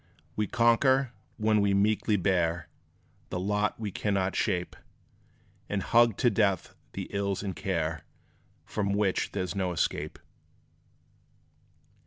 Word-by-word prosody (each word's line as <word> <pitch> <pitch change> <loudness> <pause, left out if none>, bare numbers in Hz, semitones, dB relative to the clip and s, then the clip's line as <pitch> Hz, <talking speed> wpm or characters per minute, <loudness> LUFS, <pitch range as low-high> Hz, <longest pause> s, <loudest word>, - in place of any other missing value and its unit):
We 105 -1 0
conquer, 125 +2 +3 0.2
when 110 -1 +3
we 100 -1 +2
meekly 105 +1 +2
bear 85 -3 0 0.6
The 90 - -3
lot 105 +3 0
we 105 -3 -3
cannot 95 -1 -1
shape, 90 -4 -1 0.9
And 100 -2 -1
hug 115 -2 +4
to 120 - +3
death 100 -4 +1 0.2
the - - -4
ills 100 0 -1
and 95 -2 -3
care 80 -5 -2 0.6
From 100 -1 -1
which 100 -2 +1
there 90 - -1
's 90 - -4
no 95 -2 -1
escape. 85 - -2
100 Hz, 125 wpm, -29 LUFS, 95-105 Hz, 0.9 s, hug